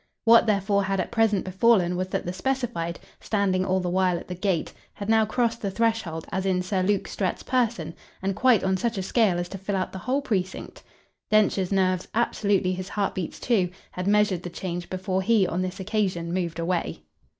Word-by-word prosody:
What 230 0 +7
therefore 200 -1 +2
had 195 0 -1
at - - -2
present 225 -4 +2
befallen 185 -2 +3
was 185 +1 -1
that - - -3
the 175 - -3
specified, 235 -8 -2 0.2
standing 195 -3 0
all 190 0 +1
the 180 - -2
while 185 -1 +2
at - - -9
the - - -3
gate, 180 -2 -1 0.2
had 200 +1 -6
now 220 -1 +4
crossed 230 0 0
the 200 - -1
threshold 220 -7 -1
as 190 +1 -1
in 185 -1 +1
Sir 185 0 -1
Luke 200 +1 +1
Strett's 190 -3 -2
person 230 -11 0 0.3
and 195 0 -2
quite 235 -1 +4
on 190 0 +1
such 230 +2 -1
a 190 - -1
scale 200 -2 +2
as 175 0 -2
to 195 - -7
fill 195 +1 -2
out 185 -1 -1
the 190 - -6
whole 265 +9 -1
precinct. 190 -7 -3 0.5
Densher's 205 -3 +2
nerves, 185 -2 +1
absolutely 200 -5 +1
his 185 +1 -5
heart 200 -2 -1
beats 180 -4 -5
too, 200 -8 +1 0.2
had 180 +1 -4
measured 205 -3 +3
the 180 - -6
change 175 0 -5
before 185 0 -1
he 210 0 +3
on 180 0 -1
this 185 +1 -4
occasion 185 -4 -1
moved 170 -3 -2
away. 170 +1 -2
190 Hz, 205 wpm, -25 LUFS, 180-215 Hz, 0.5 s, What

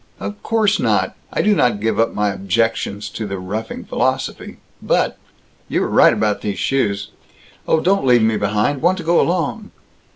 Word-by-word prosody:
"Of 100 +1 -6
course 215 -2 +1
not. - - +1 0.2
I - - 0
do 210 - +4
not 120 - +2
give 110 +2 -1
up 115 - +2
my 105 0 0
objections 100 +1 -1
to 110 - -5
the 100 0 -4
roughing 105 +5 -5
philosophy, - - -2 0.2
but - - 0 0.5
You - - 0
were - - -1
right - - +6
about 105 -2 0
these 100 -2 -3
shoes 100 -7 -1 0.6
Oh, 160 - +3
don't 195 +2 +1
leave 120 -2 +5
me 110 0 +2
behind! 105 +7 0
Want 180 +3 +2
to 175 - -6
go 170 +1 +3
along!" 180 +5 -1
110 Hz, 175 wpm, -19 LUFS, 100-165 Hz, 0.6 s, right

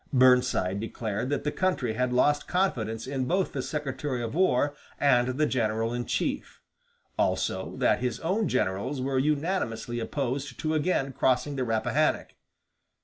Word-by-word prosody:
Burnside 125 -7 +4
declared 110 +1 -3
that 145 - -1
the 150 - 0
country 165 -12 0
had 125 +2 0
lost 145 +4 +2
confidence 115 - -1
in 130 -1 -2
both 185 +7 0
the 135 - -2
Secretary 135 -3 -3
of 115 - -4
War 145 -5 +2 0.3
and 125 -4 +4
the 155 - +3
general 115 -3 0
in 120 0 -2
chief; - - -2 0.6
also, - - 0
that - - +3
his 125 -2 -2
own 195 +5 0
generals 130 +1 -1
were 130 0 0
unanimously 140 - -1
opposed 135 +2 -3
to 155 0 0
again 145 -4 0
crossing 130 +3 +1
the 130 - -1
Rappahannock. 115 -2 +1
130 Hz, 145 wpm, -27 LUFS, 120-145 Hz, 0.6 s, Burnside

